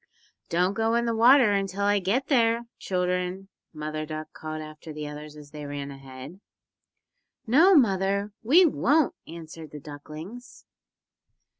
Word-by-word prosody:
"Don't 180 +3 +1
go 225 +2 +1
in 235 0 +1
the 230 -1 0
water 240 0 +6
until 195 0 -1
I 205 0 +3
get 210 +9 0
there, 235 -4 +2 0.2
children," 180 +1 -2 0.2
Mother 155 -1 -4
Duck 155 0 -7
called 155 0 -6
after 155 +1 -9
the 150 0 -6
others 150 0 -9
as 145 -1 -13
they 150 -1 -7
ran 140 0 -5
ahead. 135 +5 -11 1.1
"No, 320 - +6
mother, 200 - +2
we 315 +11 +6
won't," 300 -1 +2
answered 160 -1 -9
the 150 - -9
ducklings. 155 - -10
180 Hz, 140 wpm, -26 LUFS, 155-225 Hz, 1.1 s, water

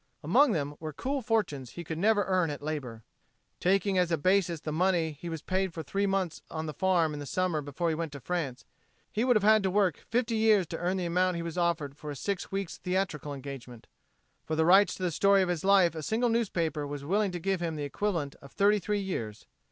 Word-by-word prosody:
Among 235 - +4
them 145 -3 -2
were 155 -1 -6
cool 270 - -2
fortunes 195 - -1
he 175 - -6
could 160 0 -5
never 205 +2 +3
earn 185 -3 +1
at 145 -1 -6
labor. 130 -7 -5 0.6
Taking 195 +1 +2
as 175 -1 +1
a 165 - +2
basis 180 0 +2
the 155 - -5
money 170 0 +1
he 155 +4 -8
was 160 -2 -5
paid 190 -2 -1
for 160 - -4
three 200 +7 -1
months 190 -4 -1
on 160 0 -4
the 155 - -4
farm 175 -4 +2
in 150 - -5
the 145 - -6
summer 180 -3 0
before 145 +4 -2
he - - +1
went 160 -1 -3
to 140 - -7
France, 145 -5 -3 0.5
he 215 - 0
would 250 -1 +4
have 215 - +3
had 215 +1 +6
to 190 - 0
work 190 -4 +2
fifty 235 0 0
years 215 -4 +4
to 165 - -4
earn 180 +2 0
the 180 - -2
amount 180 +1 +1
he 170 - -3
was 170 -1 -5
offered 170 -5 0
for 150 +1 -8
a 145 - -4
six 200 +6 -3
weeks' 195 -3 -4
theatrical 180 -6 -2
engagement. 135 -4 -8 0.6
For 155 - -3
the 160 0 +2
rights 195 +4 +6
to 185 - -7
the 180 - +1
story 200 +4 +4
of 180 - -2
his 175 -3 -2
life 190 -3 +5
a 160 - -5
single 225 +9 0
newspaper 170 -10 0
was 140 -1 -6
willing 200 +5 +1
to 175 - -3
give 190 +1 -1
him 165 -2 -2
the 150 - -4
equivalent 155 -1 -2
of 140 - -13
thirty 205 +1 +3
three 205 +1 -1
years. 115 - -5
175 Hz, 235 wpm, -29 LUFS, 155-195 Hz, 0.6 s, had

